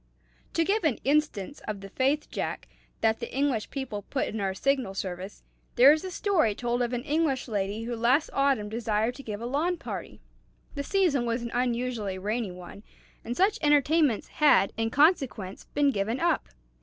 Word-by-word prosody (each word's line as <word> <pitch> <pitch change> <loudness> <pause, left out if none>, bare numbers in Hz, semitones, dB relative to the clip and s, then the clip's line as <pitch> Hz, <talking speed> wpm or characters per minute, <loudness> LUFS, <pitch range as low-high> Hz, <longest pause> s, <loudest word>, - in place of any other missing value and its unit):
To 330 - +3
give 415 +3 +1
an 300 -8 +2
instance 285 -4 0
of 205 -2 -4
the 195 - -9
faith, 275 +7 0
Jack, - - -4 0.3
that 225 0 +2
the 235 - -6
English 265 -5 0
people 265 -7 -4
put 260 +6 -2
in 220 - -4
our 190 -1 -1
Signal 265 -5 0
Service, 190 +1 -5 0.3
there 265 +4 +8
is 310 - -2
a 375 - -4
story 345 - +1
told 240 +1 -1
of 240 -1 0
an 245 -1 -2
English 295 -3 0
lady 205 0 -2
who 240 +1 -3
last 245 +7 +2
autumn 275 -6 +2
desired 220 +1 -1
to 275 - -10
give 215 -4 -6
a - - -4
lawn 310 +8 0
party. - - -7 0.5
The 285 - -3
season 285 -7 +1
was 235 +1 -1
an 235 - -5
unusually 240 -5 -1
rainy 210 +3 -2
one, 180 +2 -10 0.4
and 240 +2 -4
such 395 +3 +3
entertainments 295 -4 +3
had, 245 -10 +4
in 225 0 -1
consequence, 265 - +1
been 285 -1 +1
given 215 +2 -1
up. 340 -3 +1
245 Hz, 180 wpm, -27 LUFS, 215-290 Hz, 0.5 s, there